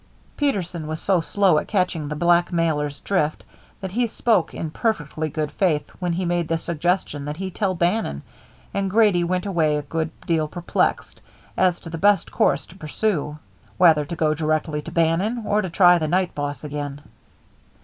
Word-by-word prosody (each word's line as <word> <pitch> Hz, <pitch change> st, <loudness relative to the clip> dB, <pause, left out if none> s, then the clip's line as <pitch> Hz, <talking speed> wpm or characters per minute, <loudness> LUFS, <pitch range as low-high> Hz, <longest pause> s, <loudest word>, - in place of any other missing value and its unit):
Peterson 180 Hz, -, -1 dB
was 155 Hz, 0 st, -4 dB
so 190 Hz, -3 st, +2 dB
slow 180 Hz, 0 st, +3 dB
at -, -, -7 dB
catching 180 Hz, -6 st, 0 dB
the 150 Hz, -, -4 dB
blackmailer's 165 Hz, -3 st, +1 dB
drift 155 Hz, -6 st, -1 dB, 0.4 s
that 190 Hz, -2 st, -5 dB
he 240 Hz, +4 st, +1 dB
spoke 220 Hz, -4 st, +1 dB
in 160 Hz, -, -5 dB
perfectly 155 Hz, -7 st, -2 dB
good 150 Hz, 0 st, -3 dB
faith 160 Hz, -6 st, +1 dB
when 180 Hz, -2 st, -1 dB
he 180 Hz, +2 st, -2 dB
made 175 Hz, -1 st, 0 dB
the 165 Hz, -, 0 dB
suggestion 170 Hz, -2 st, -1 dB
that 150 Hz, +1 st, -5 dB
he 190 Hz, +1 st, -4 dB
tell 190 Hz, 0 st, -1 dB
Bannon, 170 Hz, -, 0 dB, 0.5 s
and 200 Hz, -1 st, -1 dB
Grady 205 Hz, -4 st, +4 dB
went 180 Hz, +2 st, -1 dB
away 165 Hz, -6 st, +1 dB
a 150 Hz, -, -3 dB
good 160 Hz, +2 st, -2 dB, 0.2 s
deal 160 Hz, -2 st, +1 dB
perplexed 175 Hz, +3 st, -1 dB, 0.3 s
as 180 Hz, -2 st, +2 dB
to 165 Hz, -, -9 dB
the 165 Hz, -, -5 dB
best 205 Hz, +1 st, +3 dB
course 140 Hz, -, +1 dB
to 180 Hz, -, -16 dB
pursue, 155 Hz, -2 st, -2 dB, 0.4 s
whether 160 Hz, -4 st, +5 dB
to 160 Hz, +4 st, -6 dB
go 155 Hz, -2 st, +2 dB
directly 155 Hz, 0 st, -1 dB
to -, -, -9 dB
Bannon, 180 Hz, +8 st, +1 dB
or 210 Hz, 0 st, +2 dB
to 190 Hz, -, -4 dB
try 175 Hz, 0 st, +5 dB
the 155 Hz, -, -1 dB
night 180 Hz, +2 st, +1 dB
boss 145 Hz, -2 st, -4 dB
again. 145 Hz, -1 st, -5 dB
170 Hz, 180 wpm, -23 LUFS, 155-185 Hz, 0.5 s, whether